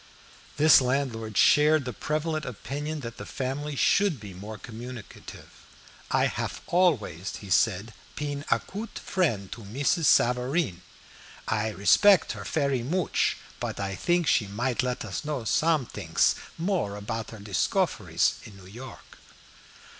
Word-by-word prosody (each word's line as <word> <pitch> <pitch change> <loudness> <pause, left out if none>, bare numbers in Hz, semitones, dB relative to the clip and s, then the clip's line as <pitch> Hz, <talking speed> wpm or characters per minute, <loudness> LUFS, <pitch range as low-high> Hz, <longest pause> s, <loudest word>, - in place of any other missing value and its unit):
This 155 -1 +7
landlord 125 -5 -1
shared 150 -1 +5
the 125 - -4
prevalent 155 +5 -2
opinion 145 +6 -5
that 115 -2 -7
the - - -7
family 140 +3 -3
should 190 - +3
be 100 -3 -9
more 105 +4 -8
communicative. 115 +2 -10 0.6
"I - - +3
haf - - -3
always," 115 - +1 0.2
said 105 +2 +2
he, - - -24
"peen 145 -1 -4
a - - +3
coot 215 +4 -8
frient 115 - -1
to 120 - -7
Mrs. 140 - 0
Safareen. 125 - +2 0.7
I 110 0 0
respect 180 - +5
her - - -6
fery 140 -5 0
mooch, 170 +9 0 0.2
put - - -4
I 100 -1 -2
think 175 - +1
she 110 -6 +2
might 120 +5 -1
let 125 -2 -2
us 95 - -4
know 150 -5 -3
sometings 155 +3 +1 0.2
more 165 - -1
apout 110 +2 -4
her 110 - -9
discoferies 100 -2 0
in 100 - -12
New 95 - -14
York." 120 +6 -12
125 Hz, 140 wpm, -27 LUFS, 110-150 Hz, 0.7 s, This